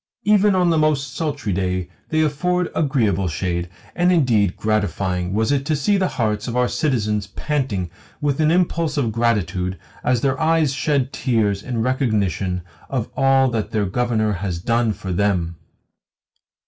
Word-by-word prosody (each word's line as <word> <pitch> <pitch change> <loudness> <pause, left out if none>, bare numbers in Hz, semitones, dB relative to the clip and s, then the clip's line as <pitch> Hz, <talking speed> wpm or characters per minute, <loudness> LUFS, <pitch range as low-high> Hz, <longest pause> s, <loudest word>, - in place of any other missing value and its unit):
Even 205 0 +4
on 180 -2 +3
the 160 - +2
most 145 -4 +1
sultry 145 - -2
day 90 -1 -1 0.2
they 155 0 +2
afford 180 +4 0
agreeable 110 - +1
shade, 85 +1 -2 0.3
and 175 +1 +3
indeed 115 - +2
gratifying 95 -4 -1
was 110 +6 +1
it 140 -1 +1
to 155 - +2
see 175 +9 +2
the 190 -1 +2
hearts 105 -2 0
of 120 0 -2
our 125 0 +3
citizens 105 -10 0
panting 125 - -2 0.3
with 145 -1 0
an 155 -1 +3
impulse 170 -2 +1
of 120 -6 +1
gratitude 95 -5 0 0.3
as 125 -2 +1
their 135 -1 0
eyes 160 -3 +2
shed 140 -2 0
tears 105 -6 0
in 115 -1 -2
recognition 105 -8 0 0.3
of 125 -5 -2
all 135 0 +4
that 110 -3 -2
their 105 -2 0
Governor 110 +1 0
has 90 -2 -3
done 115 +4 +1
for 95 -2 -5
them!" 90 -3 0
120 Hz, 160 wpm, -21 LUFS, 100-145 Hz, 0.3 s, Even